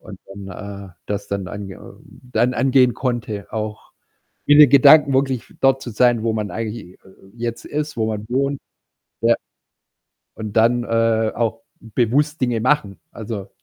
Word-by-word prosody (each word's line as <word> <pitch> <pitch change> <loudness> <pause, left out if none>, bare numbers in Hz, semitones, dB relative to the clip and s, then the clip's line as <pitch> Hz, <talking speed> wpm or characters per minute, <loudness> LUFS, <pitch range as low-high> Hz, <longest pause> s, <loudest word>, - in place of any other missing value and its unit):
Und - - -11
dann, 100 0 -9
äh, - - -22
das 100 0 -4
dann 100 -2 -3
an 100 0 -7
ähm, 95 - -13 0.3
dann 125 +1 +2
angehen 130 -1 +3
konnte, 115 -6 -4
auch 110 -1 -5 0.5
in 145 0 +6
den 150 -2 +9
Gedanken 140 +1 +7
wirklich 130 -2 -1
dort 135 0 +3
zu 120 - -6
sein, 120 0 +2
wo 115 0 0
man 105 -2 -3
eigentlich 110 0 -4 0.2
j - - -40
äh, - - -18
äh, 95 0 -20
jetzt 115 0 -4
ist, 150 0 -4
wo 110 -1 0
man 105 -1 -4
wohnt. 140 +2 0 0.6
Ja. - - +4 1.0
Und 110 -2 -7
dann, 120 +2 +3
äh, 115 -1 +1
auch 115 -1 -1 0.2
bewusst 130 +7 0
Dinge 120 -3 0
machen. 125 -7 0
Also 105 -3 -7
115 Hz, 165 wpm, -20 LUFS, 105-130 Hz, 1.0 s, den